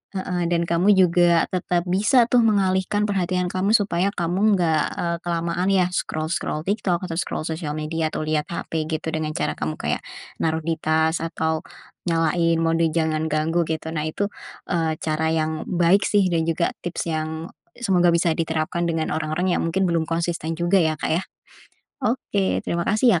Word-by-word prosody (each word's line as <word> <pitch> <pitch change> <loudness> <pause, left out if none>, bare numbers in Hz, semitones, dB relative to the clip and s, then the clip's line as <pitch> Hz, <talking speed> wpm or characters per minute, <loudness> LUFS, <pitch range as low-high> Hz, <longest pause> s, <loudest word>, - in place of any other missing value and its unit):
Heeh, 180 -2 -1
dan 170 -1 +1
kamu 175 +5 +3
juga 175 -2 +4
tetap 175 -1 0
bisa 210 +7 +4
tuh 245 - +5
mengalihkan 200 -2 +2
perhatian 185 -3 0
kamu 195 +4 +2
supaya 195 -2 0
kamu 190 +5 +2
nggak, 160 -4 +2
eee, 170 0 -1
kelamaan 170 +2 -1
ya 190 -2 +4
scroll-scroll 155 -1 -2
TikTok 195 -3 0
atau 170 - -5
scroll 155 - -3
sosial 160 -2 -3
media 155 +1 -1
atau 155 - -4
liat 155 -1 0
HP 160 -2 -3
gitu 160 0 -2
dengan 155 -1 -2
cara 75 - 0
kamu 75 +1 -3
kayak - - -2 0.4
naruh 160 0 0
di 165 - +1
tas 160 +1 +2
atau 160 -1 -1 0.4
nyalain 165 0 +2
mode 165 0 +2
jangan 160 -1 0
ganggu 160 +2 +1
gitu, 160 0 -3
nah 155 -1 -2
itu, 200 +6 -2 0.4
eee, 165 -3 +1
cara 155 0 -1
yang 155 -1 -1
baik 180 +2 +3
sih 205 - +3
dan 165 -2 +1
juga 165 +1 +1 0.2
tips 170 -1 -3
yang 160 +1 -3 0.3
semoga 180 -7 +2
bisa 170 0 +2
diterapkan 165 +1 -1
dengan 165 -1 -1
orang-orang 155 +4 -1
yang - - -1
mungkin 180 +4 0
belum 165 -1 +1
konsisten 165 0 -2
juga 175 +3 +2
ya, 160 -4 +3
Kak, - - -1
ya? 165 - +2 0.8
Oke, 205 -4 0
terima 170 0 -1
kasih 215 -3 +4
170 Hz, 170 wpm, -23 LUFS, 160-180 Hz, 0.8 s, tuh